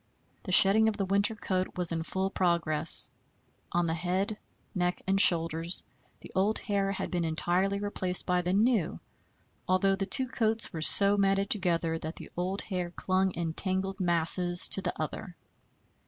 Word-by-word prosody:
The 185 - -8
shedding 200 +4 +7
of 215 -2 -2
the 195 - -2
winter 200 +3 +1
coat 185 -3 -4
was 180 -2 -2
in 165 -1 -3
full 190 +3 -4
progress. 170 -5 +4 0.6
On 175 0 -1
the 160 - -2
head, 185 +5 -2 0.4
neck, 180 -1 -2
and 195 +1 +4
shoulders 165 0 +3 0.4
the - - -13
old 200 +3 0
hair 200 -2 -3
had 195 - -6
been 175 -2 -2
entirely 175 +5 -1
replaced 185 -3 -3
by 180 0 -1
the 180 +1 -3
new, 205 - 0 0.7
although 190 +1 +1
the 195 0 -5
two 260 +2 0
coats 225 -3 -2
were 160 - -6
so 200 +5 +4
matted 195 0 0
together 170 -5 0
that 160 +1 -7
the - - -12
old 185 +3 -4
hair 180 -3 -5
clung 185 +2 -2
in 165 -1 -4
tangled 190 +2 -3
masses 175 0 +1
to 195 - +3
the - - -5
other. 165 +3 -7
185 Hz, 170 wpm, -27 LUFS, 175-195 Hz, 0.7 s, shedding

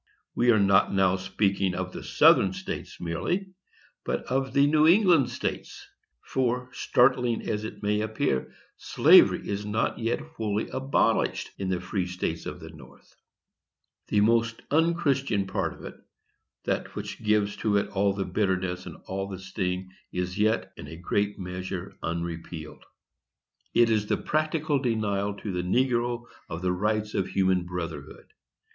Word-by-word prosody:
We 120 +1 +2
are 115 - +6
not 100 -1 +4
now 95 -1 +3
speaking 95 0 0
of 90 0 -3
the - - -7
Southern 95 - +5
States - - -6
merely, 175 - -2 0.5
but - - -2
of 135 +1 -1
the 140 0 +5
New 155 +1 +4
England 170 - +5
States; 120 - -5 0.4
for, 125 -1 -1
startling 125 -1 +2
as 105 0 -2
it 110 - -8
may 105 +1 +1
appear, 110 - -1 0.3
slavery - - +5
is 100 0 -2
not 105 +4 -1
yet 115 +1 0
wholly 110 -9 -3
abolished 135 +1 0
in 95 -1 -2
the 90 -1 0
free 95 -2 -2
states 90 -2 -3
of - - -6
the - - -10
North. - - -16 0.9
The 105 - +2
most 115 +1 +2
unchristian 140 - +2
part 95 - -2
of - - -12
it, - - -9 0.7
that - - -2
which - - -6
gives 105 -1 +2
to 105 -2 +1
it 100 0 0
all 100 0 +1
the 100 -1 -2
bitterness 95 -2 -1
and - - -9
all 95 +1 -3
the 95 -1 -6
sting, 95 0 -3 0.2
is 90 0 -3
yet, 110 +1 +1
in - - -9
a 80 - -9
great 100 +3 -1
measure, 90 0 -5
unrepealed; 85 -1 -5 0.9
it 120 -1 +5
is 105 -1 +1
the - - +1
practical 155 -1 0
denial 105 -5 -1
to 100 0 -5
the 90 -1 -1
negro 120 +4 +1 0.3
of 85 +2 -5
the 90 0 +1
rights 105 +3 -1
of 95 - 0
human 95 -2 +1
brotherhood. 85 -5 -7
105 Hz, 155 wpm, -27 LUFS, 95-120 Hz, 0.9 s, are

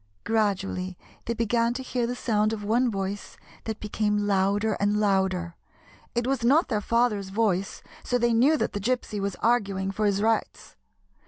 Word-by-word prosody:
Gradually 195 -4 -1 0.3
they 235 - -2
began 230 +1 +1
to 260 - -4
hear 245 -2 -1
the 245 - -3
sound 215 -3 +1
of 210 -2 -5
one 240 +4 +2
voice 195 -1 -4 0.3
that 220 -1 -4
became 210 -1 -1
louder 200 +2 +1
and 205 +1 +2
louder. 190 -4 +1 0.6
It 240 0 0
was 265 -2 -1
not 285 +8 +4
their 215 -4 0
father's 220 -3 +1
voice, 195 -2 -1 0.2
so 245 - +1
they 240 -1 +2
knew 270 +7 +4
that - - -1
the 205 - -2
Gypsy 220 -1 -1
was 200 -1 -2
arguing 200 -5 0
for 210 +2 0
his 200 -1 +1
rights. 225 +2 -1
210 Hz, 170 wpm, -26 LUFS, 200-235 Hz, 0.6 s, not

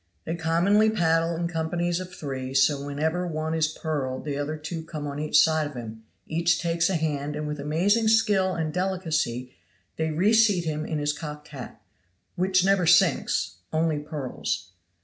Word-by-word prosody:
They 165 - -2
commonly 175 +7 +3
paddle 165 -4 +2
in 170 +1 -1
companies 170 +1 -1
of 185 0 -7
three; 135 -5 -5
so 140 +1 +4
then 140 - -6
whenever 160 +5 -1
one 155 -1 -2
is 160 -1 +2
purled 150 -5 -3
the 145 -2 -2
other 145 +2 -3
two 160 +2 -5
come 155 -2 -6
on 145 0 -4
each 155 0 +3
side 155 -1 +3
of 145 - -10
him, 110 -2 -7 0.2
each 170 +1 +1
takes 170 0 +1
a 190 - 0
hand 150 -2 -2
and 150 0 -3
with 150 0 -4
amazing 185 +10 +2
skill 205 -4 +3
and 160 -2 -2
delicacy 160 -10 -1 0.4
they 160 0 0
reseat 200 +2 +3
him 155 -1 -2
in 155 - -2
his 145 0 0
cocked 150 -1 -8
hat, 130 -6 -9 0.6
which 185 0 +2
never 195 -3 +3
sinks 175 - +3
only 160 -1 +1
purls. 145 - -4
160 Hz, 175 wpm, -26 LUFS, 150-175 Hz, 0.6 s, so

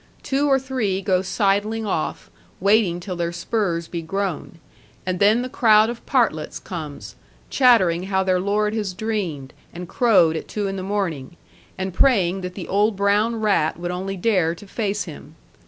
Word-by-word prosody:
Two 280 +2 0
or 270 - +5
three 255 -8 -2
go 185 -1 +1
sidling 205 +3 0
off, 175 -6 -3 0.3
waiting 200 -3 +3
till 180 +1 -6
their 170 -1 -2
spurs 175 -2 -2
be 170 - -5
grown; 185 0 -4 0.5
and 185 -1 -2
then 215 +4 +4
the - - -3
crowd 220 -3 +4
of 240 - -10
partlets 225 - 0
comes, 155 -6 -7 0.4
chattering 190 -10 +4
how 190 -1 +1
their 185 -1 +1
lord 210 +2 0
has 205 -4 -3
dreamed, 185 -11 -3 0.2
and 175 +1 -8
crowed 185 -8 +3
at 160 - -5
two 210 -1 -3
in 195 - -3
the 190 - -4
morning, 180 -7 -3 0.4
and 190 -1 -3
praying 195 -6 +2
that 180 0 -6
the 190 - -6
old 205 +2 +2
brown 205 +4 +2
rat 195 -8 +1
would 175 0 -3
only 190 +2 -4
dare 180 -5 +1
to 205 - -13
face 205 0 -2
him. - - -11
195 Hz, 170 wpm, -22 LUFS, 175-215 Hz, 0.5 s, or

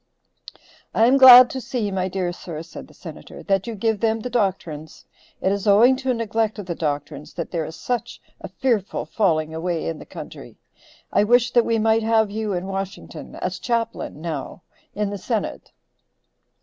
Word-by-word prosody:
"I 225 - +5
am 260 +3 +5
glad 255 -1 +11
to 260 - -4
see, 230 -5 -3
my 190 -1 -1
dear 185 -1 -2
sir," 165 -3 -7
said 165 - -11
the - - -19
Senator, - - -11
"that 195 0 0
you 230 - -4
give 220 +1 0
them 225 0 +1
the 250 - -5
doctrines. 180 -9 -3 0.4
It 190 - +1
is 200 +1 -2
owing 225 +6 +6
to 265 0 -4
a 250 - +2
neglect 225 -1 -1
of 205 - -6
the 175 - -3
doctrines, 150 -1 -4
that 170 - -5
there 165 -3 -2
is 160 - -8
such 240 +8 -4 0.2
a - - -7
fearful 225 -7 -1
falling 160 -7 0
away 165 +1 -2
in 165 -1 -4
the - - -12
country. - - -10 0.6
I - - +4
wish 245 +2 +3
that 240 -2 +4
we 230 - +1
might 220 +1 +2
have 220 -2 +2
you 215 0 -3
in 180 0 -3
Washington 195 0 -6
as 185 0 -4
chaplain, 230 - -3
now, 165 0 -5 0.3
in 205 0 -1
the 200 - -5
senate." 220 +1 -4
205 Hz, 190 wpm, -22 LUFS, 175-230 Hz, 0.6 s, glad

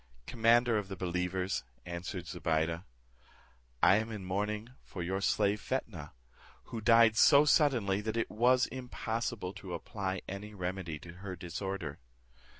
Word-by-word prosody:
"Commander 115 -1 +3
of 100 - -6
the 95 - -6
believers," 90 0 -1 0.2
answered 85 +1 -5
Zobeide, 85 -1 -1 1.0
"I 95 - +7
am 110 +1 -2
in 105 -4 -6
mourning 105 +4 -2
for 90 - -7
your 95 +3 -2
slave 105 +1 +2
Fetnah; 100 - -4 0.5
who 115 - -6
died 115 0 +6
so 145 +5 +7
suddenly 120 -11 +3
that 110 +2 -3
it 115 - -1
was 125 +3 +4
impossible 115 -5 -4
to 90 -4 -6
apply 95 +1 -4
any 105 +2 -7
remedy 90 -3 -4
to 85 +3 -11
her 95 -2 -5
disorder." 90 -2 -5
100 Hz, 140 wpm, -32 LUFS, 90-115 Hz, 1.0 s, I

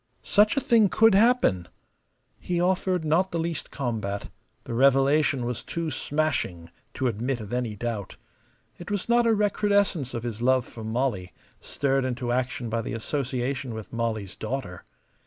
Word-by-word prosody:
Such 210 +5 +3
a - - +3
thing 230 -7 +4
could 225 +2 +5
happen! 200 - +3 0.7
He 175 -1 -2
offered 180 -1 +1
not 170 +5 +2
the 170 - -3
least 165 -1 -3
combat; 110 -7 -3 0.3
the - - -6
revelation 135 +1 +3
was 120 -1 -3
too 165 -2 -4
smashing 130 - -2 0.2
to 130 - -2
admit 120 +2 -1
of 105 0 -7
any 120 -3 -2
doubt. 110 -2 -4 0.6
It 175 - -8
was 205 -2 -2
not 235 0 +4
a 225 - +4
recrudescence 200 - +1
of 115 - -4
his 115 -2 -5
love 130 0 +3
for 115 - -10
Molly, 110 -5 -2 0.3
stirred 135 -1 0
into 125 -1 -2
action 125 -1 -1
by 115 +1 -1
the 105 - -5
association 130 0 -2
with 110 0 -8
Molly's 110 -4 -2
daughter. 110 -6 -5
130 Hz, 155 wpm, -26 LUFS, 115-170 Hz, 0.7 s, could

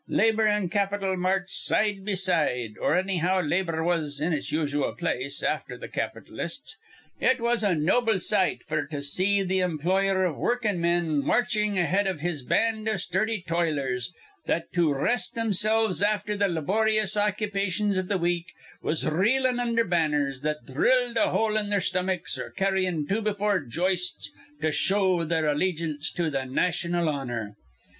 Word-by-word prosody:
Labor 220 0 +3
an' 210 -4 +1
capital 200 -1 0
marched 190 +1 -1
side 205 -2 +1
be 205 0 -1
side, 165 - +1
or - - +2
annyhow 185 0 +1
labor 165 -1 0
was 160 -4 0
in 165 +3 0
its 145 -1 -3
usual 145 -6 -1
place, 130 +4 -3
afther - - -2
th' - - -10
capitalists. - - -4 0.4
It 260 0 +3
was 235 -1 +1
a 195 -4 +2
noble 215 +8 +2
sight 190 +1 +1
f'r 155 -1 -2
to 145 -2 -4
see 195 +7 +1
th' 190 +1 +1
employer 185 +3 +1
iv 165 -6 -2
workin'men 175 - +1
marchin' 215 -4 +1
ahead 190 +3 +2
iv 180 -6 -3
his 165 -3 -2
band 220 - 0
iv 215 -3 0
sturdy 190 +3 -1
toilers 150 -6 -1 0.4
that 165 0 -1
to 170 -4 +3
rest 185 - 0
thimsilves 220 -2 +2
afther 210 0 +1
th' 200 -1 +1
layboryous 215 +5 +1
occupations 205 -1 0
iv 185 -1 -2
th' 200 -2 +1
week 175 0 -1 0.3
was 155 - -1
reelin' 245 +10 +2
undher 230 -1 +1
banners 150 -6 +1
that 150 0 -2
dhrilled 245 - +2
a 230 - +3
hole 220 -1 +1
in 210 -1 0
their 205 -1 +2
stomachs 185 -1 -1
or - - -5
carryin' 185 -5 0
two 210 +3 0
be 215 -1 0
four 205 -1 +1
joists 180 - -2 0.3
to 155 - +1
show 190 0 +2
their 160 -1 0
allegance 155 -1 -1
to 170 -3 -1
th' 135 -2 -2
naytional 175 +3 0
honor. 120 -8 -3
185 Hz, 160 wpm, -26 LUFS, 160-210 Hz, 0.4 s, Labor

